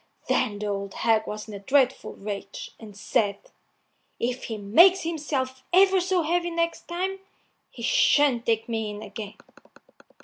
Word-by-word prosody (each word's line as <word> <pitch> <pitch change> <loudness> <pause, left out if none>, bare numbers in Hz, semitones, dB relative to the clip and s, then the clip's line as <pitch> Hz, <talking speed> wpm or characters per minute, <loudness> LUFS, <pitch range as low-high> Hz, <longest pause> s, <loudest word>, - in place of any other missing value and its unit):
Then 205 - +1
the 210 - -5
old 200 -1 -4
hag 220 -1 +1
was 210 +1 -6
in 215 - -9
a 200 - -6
dreadful 265 +4 +1
rage, 200 -1 -7
and 210 -3 -12
said, 205 -1 0 0.8
"If 250 +2 -2
he 225 - -4
makes 335 - +5
himself 285 -5 -3
ever 380 +1 +5
so 365 -1 +1
heavy 345 +2 0
next 335 0 -2
time, 375 +3 -3 0.5
he - - -11
shan't 290 - +3
take 225 -1 +1
me 225 -2 -2
in 210 +1 -7
again." 210 -3 -8
245 Hz, 150 wpm, -25 LUFS, 210-335 Hz, 0.8 s, makes